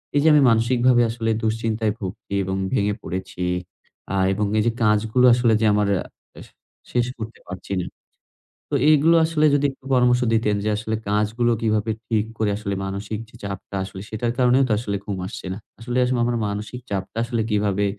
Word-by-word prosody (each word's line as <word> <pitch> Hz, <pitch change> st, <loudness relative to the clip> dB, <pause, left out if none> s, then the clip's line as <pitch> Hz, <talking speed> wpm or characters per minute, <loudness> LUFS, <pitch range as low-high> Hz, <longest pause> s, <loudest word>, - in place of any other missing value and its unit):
এইযে 145 Hz, +2 st, +3 dB
আমি 150 Hz, -, +6 dB
মানসিকভাবে 120 Hz, +2 st, +3 dB
আসলে 115 Hz, -1 st, -2 dB
দুশ্চিন্তায় 110 Hz, 0 st, 0 dB
ভুগছি 95 Hz, 0 st, -7 dB
এবং 95 Hz, +1 st, -2 dB, 0.2 s
ভেঙে 105 Hz, 0 st, +1 dB
পড়েছি 90 Hz, +1 st, -5 dB, 0.7 s
আ -, -, 0 dB, 0.2 s
এবং 105 Hz, +2 st, 0 dB
এই -, -, +2 dB
যে -, -, +3 dB
কাজগুলো 110 Hz, +3 st, +3 dB
আসলে 120 Hz, -1 st, +3 dB
যে -, -, +3 dB
আমার 105 Hz, 0 st, +2 dB, 0.5 s
আস -, -, -12 dB, 0.5 s
শেষ 120 Hz, -1 st, +2 dB
করতে 110 Hz, +1 st, -7 dB
পারছি 95 Hz, +2 st, -6 dB
না। 90 Hz, -, -2 dB, 0.8 s
তো 145 Hz, -, -1 dB, 0.2 s
এগুলো 155 Hz, +3 st, +5 dB
আসলে 160 Hz, -1 st, +1 dB
যদি 145 Hz, -, +1 dB
একটু 135 Hz, 0 st, -21 dB
পরামর্শ 125 Hz, 0 st, +4 dB
দিতেন 110 Hz, -2 st, +2 dB
যে 110 Hz, -, 0 dB
আসলে 110 Hz, +1 st, -2 dB
কাজগুলো 105 Hz, +3 st, +1 dB
কিভাবে 110 Hz, 0 st, +1 dB, 0.2 s
ঠিক 110 Hz, -2 st, +1 dB
করে 110 Hz, -2 st, +1 dB
আসলে 100 Hz, -2 st, -3 dB
মানসিক 100 Hz, +2 st, -4 dB
যে -, -, -18 dB
চাপটা 100 Hz, 0 st, -6 dB
আসলে 95 Hz, 0 st, -8 dB
সেটার 115 Hz, +2 st, -2 dB
কারণেও 125 Hz, +1 st, +4 dB
তো -, -, -3 dB
আসলে 105 Hz, -3 st, -3 dB
ঘুম 100 Hz, -2 st, -3 dB
আসছে 100 Hz, -, -8 dB
না। -, -, -6 dB, 0.2 s
আসলে 120 Hz, +2 st, -3 dB
আসলে 125 Hz, -1 st, 0 dB
আমার 120 Hz, 0 st, 0 dB
মানসিক 105 Hz, +4 st, -5 dB
চাপটা 95 Hz, +2 st, -4 dB
আসলে 120 Hz, -1 st, -1 dB
কিভাবে 100 Hz, -1 st, +1 dB
110 Hz, 180 wpm, -22 LUFS, 105-120 Hz, 0.8 s, আমি